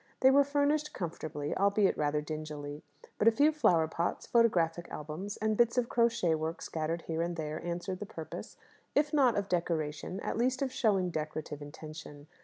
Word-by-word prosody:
They 265 - +7
were 280 +1 +6
furnished 290 +1 +1
comfortably, 155 -4 -4
albeit 200 0 +3
rather 150 0 0
dingily. 150 -1 -6 0.4
But 210 - +3
a - - +9
few 285 +7 +4
flower 175 - +3
pots, 170 +2 -2
photographic 175 -8 +2
albums, 160 +7 -5
and 215 0 0
bits 235 +2 +3
of 245 -1 +2
crochet 230 -8 +2
work, 160 +1 -2
scattered 165 +1 -3
here 165 0 -2
and 170 +1 -1
there, 155 0 -4
answered 175 +2 -3
the 210 - -5
purpose 160 -4 -8 0.4
if 295 +1 +2
not 260 -7 +4
of 200 -1 0
decoration, 165 0 -2
at - - -2
least 260 +3 +1
of 265 - -2
showing 200 -8 +1
decorative 155 -1 -4
intention. 150 0 -9
175 Hz, 175 wpm, -31 LUFS, 155-230 Hz, 0.4 s, a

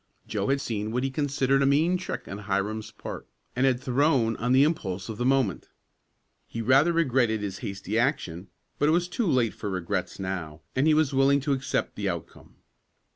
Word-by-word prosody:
Joe - - -2
had 140 +1 +2
seen 110 -5 -3
what 125 +2 -1
he 135 - -1
considered 135 -1 +1
a 135 - +3
mean 155 +6 +3
trick 180 0 -5
on 100 - -6
Hiram's 105 +2 -2
part - - -8 0.3
and 130 +2 +3
had 125 -2 +2
thrown 130 -3 +2
on 120 +2 -1
the 130 +2 +6
impulse 100 - -1
of 110 - -6
the 120 - 0
moment. 130 - +1 0.8
He 115 - -6
rather 135 +8 +4
regretted 130 -9 +2
his 100 -1 -4
hasty 105 0 -3
action, 100 - -1 0.3
but 145 - +3
it - - +4
was 175 +1 +2
too 205 +4 -1
late 125 -7 +2
for 105 - -5
regrets 95 -1 -3
now, 90 -5 -4
and 135 +4 +2
he 155 - +5
was 155 -3 +2
willing 135 +1 +4
to 140 +1 0
accept 135 -1 -2
the - - -2
outcome. - - -7
130 Hz, 195 wpm, -27 LUFS, 105-140 Hz, 0.8 s, the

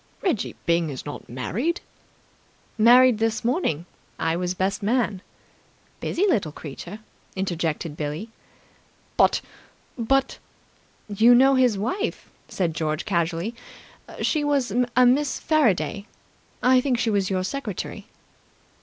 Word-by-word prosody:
"Reggie 345 - -1
Byng 170 -1 +2
is 135 -3 -7
not 145 - -8
married!" 210 - -2 1.0
"Married 240 +1 +6
this 225 0 -1
morning. 235 - 0 0.3
I 165 0 0
was 180 +1 -2
best 190 +2 -1
man." 210 -3 0 0.8
"Busy 380 - 0
little 205 - +1
creature!" 155 +7 -8 0.4
interjected 170 -4 -2
Billie. 155 +8 -4 0.9
"But - - +4 0.6
but 270 +4 +1 0.4
!" - - -35
"You 240 +2 +7
know 270 +2 +6
his 250 -5 +3
wife," 255 - -3 0.2
said 175 -4 -1
George 155 -1 -2
casually. 170 +2 -1 0.7
"She 305 -2 +1
was 280 -7 0 0.2
a 250 0 +6
Miss 270 +3 +2
Faraday. 225 - +1 0.6
I 255 0 +5
think 255 -2 0
she 230 -1 0
was 200 -2 +1
your 185 -1 0
secretary." 215 -2 -5
215 Hz, 120 wpm, -24 LUFS, 170-255 Hz, 1.0 s, You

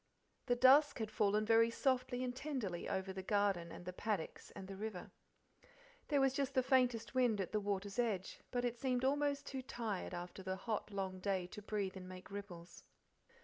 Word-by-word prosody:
The 245 - +3
dusk 270 +4 +6
had 220 -3 -3
fallen 210 0 +2
very 225 +1 +5
softly 255 0 0
and 250 -1 -2
tenderly 255 - -3
over 190 0 -2
the 190 - -4
garden, 195 -4 +1
and 175 - -9
the 180 - -4
paddocks, 205 -3 -3
and 190 - -7
the 195 - -6
river. 205 -2 -5 1.0
There 290 -2 +3
was 270 -1 +4
just 275 0 -1
the 260 - +4
faintest 250 -3 +2
wind 245 -5 +3
at 190 - -2
the 215 - +1
waters 200 +1 -2
edge, 210 -6 -1
but 245 -1 -1
it 240 -1 -2
seemed 255 -1 +1
almost 285 0 +1
too 265 -1 -4
tired 225 -7 -3
after 175 +2 -6
the 185 0 -2
hot, 215 +3 -3
long 190 -2 -3
day 190 -1 0
to 210 +4 -9
breathe 205 -2 -2
and 185 -1 -8
make 185 +1 -10
ripples. 180 -4 -8
215 Hz, 190 wpm, -38 LUFS, 190-250 Hz, 1.0 s, dusk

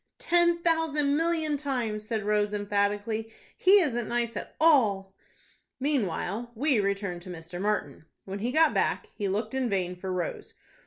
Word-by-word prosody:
"Ten 345 -8 +2
thousand 310 -4 +2
million 320 -2 +1
times," 240 -7 -3
said 220 -2 -2
Rose, 210 0 +1
emphatically. 205 +2 -1 0.2
"He 390 +2 +6
isn't 240 -8 -1
nice 235 -1 -1
at - - -6
all." 215 -12 +3 0.7
Meanwhile 235 - -1
we 270 0 +2
return 195 -3 -1
to 175 - -12
Mr. 175 +1 -7
Martin. 200 -8 -2 0.2
When 195 +1 -5
he 235 +4 -1
got 315 +2 +4
back, - - 0
he 205 - -3
looked 205 +7 -2
in 260 -2 0
vain 180 -3 -1
for 185 +1 -5
Rose. 180 -2 -4
220 Hz, 155 wpm, -28 LUFS, 200-290 Hz, 0.7 s, He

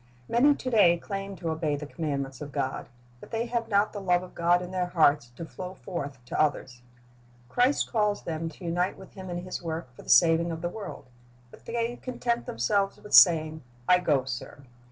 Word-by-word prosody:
Many 280 +5 +4
to 255 - -4
day 185 -7 +5
claim 195 +2 -5
to 170 -2 -3
obey 160 -2 -1
the 145 +1 -6
commandments 140 -4 -4
of 145 -1 -6
God, 130 -2 -3 0.3
but - - -13
they 230 0 -2
have 235 -1 -2
not 205 0 +2
the 205 - -5
love 180 -2 +2
of 185 - -12
God 175 +1 +2
in 180 - -8
their 180 -1 -1
hearts 150 -7 +3
to 165 - -6
flow 185 +3 -8
forth 145 -8 -6
to 125 - -1
others. 130 -5 -1 0.7
Christ 250 - +2
calls 210 -3 +1
them 165 0 -3
to 175 - -12
unite 175 +2 -1
with 190 - -13
Him 190 -1 -9
in 175 0 -4
His 185 - -5
work 160 -6 -5
for - - -12
the - - -13
saving 165 +5 +5
of 165 0 -5
the 175 - 0
world, 205 +3 -8 0.5
but - - -16
they 235 +1 -2
content 240 -2 -2
themselves 195 - 0
with 210 - -11
saying, 160 -3 +6 0.3
"I 180 0 +6
go, 145 -7 +1
sir." 130 +2 -7
175 Hz, 205 wpm, -27 LUFS, 155-200 Hz, 0.7 s, saying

